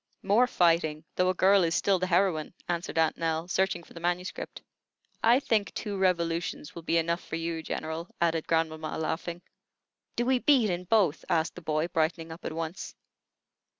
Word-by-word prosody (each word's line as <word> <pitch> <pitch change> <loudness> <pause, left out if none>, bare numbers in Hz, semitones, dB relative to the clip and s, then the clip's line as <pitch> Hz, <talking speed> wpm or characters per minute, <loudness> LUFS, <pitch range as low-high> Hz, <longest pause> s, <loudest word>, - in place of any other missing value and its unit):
"More 215 +6 +4
fighting, 165 -6 +2
though 180 0 +2
a 185 - 0
girl 195 +1 +5
is 165 0 +1
still 195 -2 +2
the 185 - -1
heroine," 175 -3 +1
answered 170 -1 -3
Aunt 160 -1 +2
Nell, 165 0 -1
searching 185 -1 0
for - - -17
the 170 - -9
manuscript. 175 +2 -3 0.6
"I 235 +3 +6
think 220 -7 0
two 205 -2 -3
revolutions 170 -4 -1
will 170 - -8
be 165 +1 +1
enough 170 +1 0
for - - -5
you, 165 0 -3
General," 160 +2 -4
added 165 -2 +1
grandmamma, 160 -1 -1
laughing. 170 +2 -3 0.7
"Do 240 - 0
we 260 0 +3
beat 245 -7 +4
in 180 +1 -3
both?" 190 -6 +2
asked 160 0 +1
the 180 - -10
boy, 155 0 0
brightening 165 0 -1
up 165 +1 -10
at - - -2
once. 165 +2 -5
170 Hz, 180 wpm, -28 LUFS, 165-185 Hz, 0.7 s, I